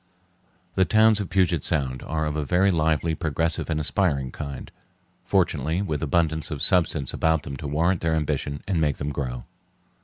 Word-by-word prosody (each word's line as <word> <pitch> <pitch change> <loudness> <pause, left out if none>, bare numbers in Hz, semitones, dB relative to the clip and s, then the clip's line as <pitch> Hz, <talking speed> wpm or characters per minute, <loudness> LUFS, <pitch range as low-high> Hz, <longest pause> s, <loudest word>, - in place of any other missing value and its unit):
The 95 - +3
towns 110 +3 +4
of 100 - -4
Puget 90 -6 +2
Sound 65 -6 -1
are 80 0 -2
of 75 -1 -2
a 75 - -1
very 90 +6 +2
lively, 80 -1 +1
progressive, 80 +1 -1
and 80 -1 0
aspiring 75 -5 0
kind, 70 -2 -7 0.5
fortunately 85 -2 +1
with 80 -6 -3
abundance 80 -1 0
of 75 -4 -4
substance 80 -7 +2
about 80 -2 +1
them 70 - -6
to 75 - -6
warrant 85 +5 +1
their 80 -1 +1
ambition 75 -2 -2
and 90 -4 0
make 75 -3 +1
them 75 0 -3
grow. 65 -4 -4
80 Hz, 175 wpm, -24 LUFS, 70-85 Hz, 0.5 s, towns